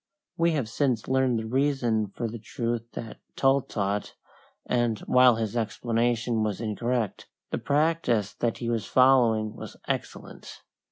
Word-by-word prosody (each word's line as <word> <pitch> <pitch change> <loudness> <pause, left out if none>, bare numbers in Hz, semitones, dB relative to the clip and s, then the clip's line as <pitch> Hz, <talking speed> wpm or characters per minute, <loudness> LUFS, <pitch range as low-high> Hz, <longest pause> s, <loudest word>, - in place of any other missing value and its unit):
We 170 0 +2
have 140 -7 -1
since 120 -1 0
learned 130 -2 +2
the 110 - -3
reason 120 -3 +1
for 115 +4 -4
the 115 +1 -7
truth 115 +1 -3
that 115 - -7 0.2
Tull 135 +1 +3
taught, 100 -3 -3 0.5
and, 120 -3 +1
while 125 -1 +5
his 110 0 -3
explanation 115 +1 0
was 105 -2 -1
incorrect, 115 0 -2 0.2
the - - -1
practice 145 -8 +1
that 120 -2 -1
he 120 - -5
was 115 -3 -1
following 120 -5 +4
was - - -9
excellent. - - -6
120 Hz, 145 wpm, -27 LUFS, 110-130 Hz, 0.5 s, while